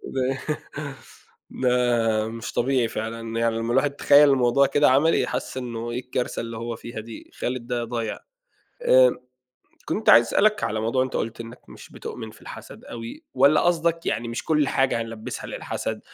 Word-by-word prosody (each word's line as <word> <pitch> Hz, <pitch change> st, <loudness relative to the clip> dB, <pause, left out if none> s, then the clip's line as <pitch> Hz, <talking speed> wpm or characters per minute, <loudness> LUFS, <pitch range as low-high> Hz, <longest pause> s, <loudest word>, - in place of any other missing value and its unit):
ده 130 Hz, -1 st, +1 dB, 2.0 s
مش 115 Hz, 0 st, -6 dB
طبيعي 125 Hz, -1 st, +1 dB
فعلًا، 115 Hz, +1 st, -4 dB
يعني 115 Hz, -1 st, +1 dB
لمّا 115 Hz, +1 st, -2 dB
الواحد 145 Hz, +3 st, +2 dB
يتخيّل 145 Hz, 0 st, +6 dB
الموضوع 135 Hz, +1 st, +4 dB
كده 145 Hz, +1 st, +3 dB
عملي 155 Hz, +5 st, +3 dB
حَس -, -, -4 dB
إنّه 120 Hz, -2 st, -4 dB
إيه 120 Hz, -, -2 dB
الكارثة 125 Hz, 0 st, -3 dB
اللي 115 Hz, -1 st, -5 dB
هو 115 Hz, 0 st, -4 dB
فيها 115 Hz, 0 st, -8 dB
دي؟ 110 Hz, 0 st, -10 dB
خالد 125 Hz, -1 st, -4 dB
ده 120 Hz, -2 st, -1 dB
ضايع. 115 Hz, -2 st, -4 dB, 0.6 s
آآ -, -, +6 dB, 0.7 s
كنت 215 Hz, -, -2 dB
عايز 115 Hz, 0 st, +8 dB
أسألك 215 Hz, +1 st, +2 dB
على 110 Hz, +1 st, -1 dB
موضوع 115 Hz, +4 st, +1 dB
أنت 130 Hz, -, -7 dB
قُلت 115 Hz, +1 st, -3 dB
إنّك 115 Hz, +1 st, -9 dB
مش -, -, -13 dB
بتؤمن 110 Hz, -3 st, -7 dB
في -, -, -18 dB
الحسد -, -, -11 dB
أوي، 115 Hz, 0 st, -8 dB
والّا 140 Hz, +4 st, +5 dB
قصدك 170 Hz, -1 st, +1 dB
يعني 115 Hz, 0 st, -1 dB
مش 115 Hz, -, -4 dB
كلّ 150 Hz, -3 st, +2 dB
حاجة 130 Hz, -3 st, +1 dB
هنلبّسها 115 Hz, -1 st, -7 dB
للحسد، -, -, -4 dB
120 Hz, 165 wpm, -24 LUFS, 115-140 Hz, 2.0 s, عايز